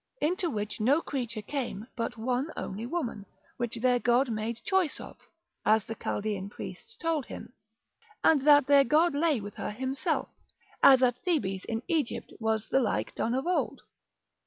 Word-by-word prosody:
into 350 +3 +1
which 210 -4 -4
no 270 +8 +4
creature 240 -8 -4
came 235 -5 -4
but 235 0 -3
one 250 +5 -1
only 210 +5 -4
woman, 250 -10 -3 0.3
which 240 -1 -2
their 245 +1 +2
god 245 +1 +2
made 220 +1 -3
choice 380 -5 +1
of, - - -9 0.5
as 215 -1 +3
the - - -4
Chaldean 205 -3 -3
priests 455 - -9
told 325 -5 -1
him, - - -9 0.7
and 310 -4 +5
that 290 -1 +6
their 280 0 +6
god 310 +6 +3
lay 295 -2 +2
with 205 0 -7
her - - -4
himself, 260 +5 -2 0.5
as 265 -1 +8
at 245 -1 +2
Thebes 195 - -1
in 225 +1 -3
Egypt 320 -8 -1
was 220 -1 0
the 270 - +3
like 240 - -1
done 235 +2 -1
of 265 - -1
old. 360 +1 0
250 Hz, 165 wpm, -29 LUFS, 220-295 Hz, 0.7 s, as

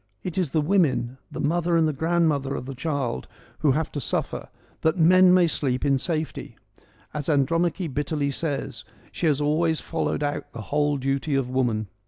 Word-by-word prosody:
It 180 - -4
is 180 -6 0
the 155 +3 +1
women, 145 -7 +1
the - - -6
mother 170 +3 +1
and 155 -3 +2
grandmother 155 -4 +1
of 125 - -5
the 135 - -6
child, 140 -3 -2 0.3
who 145 -4 +3
have 155 +2 -1
to 145 - -4
suffer, - - -3 0.3
that 160 +3 +2
men 180 +2 +6
may 180 -1 +6
sleep 135 -5 -1
in 135 -1 +3
safety. 160 +1 -3 0.6
As 150 +1 -3
Andromache 165 +3 +1
bitterly 145 0 -1
says, 135 -6 -3 0.3
she 170 - -1
has 150 -2 +2
always 155 +2 +1
followed 165 -2 -2
out 145 0 -3
the 120 - -6
whole 145 +7 0
duty 135 +2 -1
of 130 -2 0
woman. 120 -5 0
150 Hz, 175 wpm, -25 LUFS, 135-165 Hz, 0.6 s, men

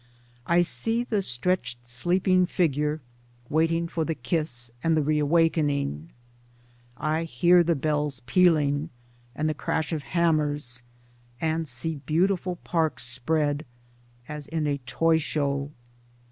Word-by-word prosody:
I 175 +1 +4
see 225 +6 +1
the 215 -4 0
stretched 125 -5 -1
sleeping 180 +8 +2
figure 150 -3 0 0.2
— 120 0 -31
waiting 165 +2 +2
for 165 -1 -2
the 160 0 -2
kiss 120 -3 -1
and 165 -1 +3
the 155 - +2
re 150 +1 +1
awakening. 145 - +1 0.9
I 155 +4 -1
hear 175 +5 +4
the 170 0 +1
bells 150 -2 -1
pealing, 150 -1 +3 0.5
and 155 - -1
the 155 - +1
crash 160 +2 -2
of 155 - -2
hammers, 150 -6 0 0.6
and 160 0 -1
see 145 +5 -2
beautiful 180 +6 0
parks 160 -6 0
spread 145 +4 0 0.3
— 120 0 -32
as 150 -2 -5
in 150 -2 -1
toy 160 +5 +2
show. 140 -2 -1
155 Hz, 130 wpm, -26 LUFS, 140-165 Hz, 0.9 s, I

